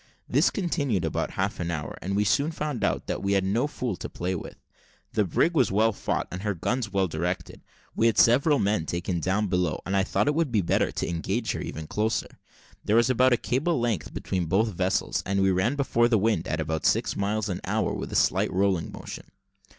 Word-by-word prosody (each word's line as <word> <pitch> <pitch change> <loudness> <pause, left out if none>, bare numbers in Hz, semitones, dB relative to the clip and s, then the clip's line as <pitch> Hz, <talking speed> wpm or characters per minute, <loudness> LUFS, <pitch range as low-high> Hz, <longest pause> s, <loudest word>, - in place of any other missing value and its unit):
This 145 +7 +3
continued 145 - -1
about - - -1
half - - -2
an 85 -1 -2
hour, 75 -4 -4
and 95 +2 -2
we 105 - +3
soon 140 +9 +2
found 150 -6 -3
that - - -1
we 100 0 0
had 95 -1 +2
no 110 +9 +1
fool 125 -7 -3
to - - -6
play 90 +2 -3
with. 90 - -6 0.6
The 105 - +2
brig 165 - +2
was 130 -10 +3
well 110 +3 +3
fought, - - -2
and 90 - -5
her 105 -1 -1
guns 115 +5 -2
well 95 -1 +1
directed. 85 +3 -3 0.3
We 115 - +3
had 115 - +1
several 140 +6 +5
men 100 -8 0
taken 85 0 -2
down 95 +5 0
below, 90 -4 0
and 95 - -1
I 95 - +3
thought 105 - 0
it 145 - +3
would 160 -3 0
be 110 -4 +2
better - - +1
to - - -3
engage 85 -1 -2
her - - -4
even 80 - -6
closer. 110 +7 -2 0.4
There 105 - +1
was 120 +2 +4
about 130 +1 +4
a - - +3
cable's 150 +7 0
length 115 -7 -1
between 90 -2 -2
both 100 +7 +2
vessels, 90 +1 0
as 100 +1 -1
we 95 0 +3
ran 95 +9 +1
before 120 -4 +2
the 120 -2 +3
wind, 100 -4 +1
at 80 - -2
about 80 0 -1
six - - +1
miles 105 +1 -1
an 90 -2 -3
hour - - 0
with - - -5
a - - -4
slight - - +2
rolling 95 -3 +1
motion. - - -8
100 Hz, 220 wpm, -26 LUFS, 90-120 Hz, 0.6 s, several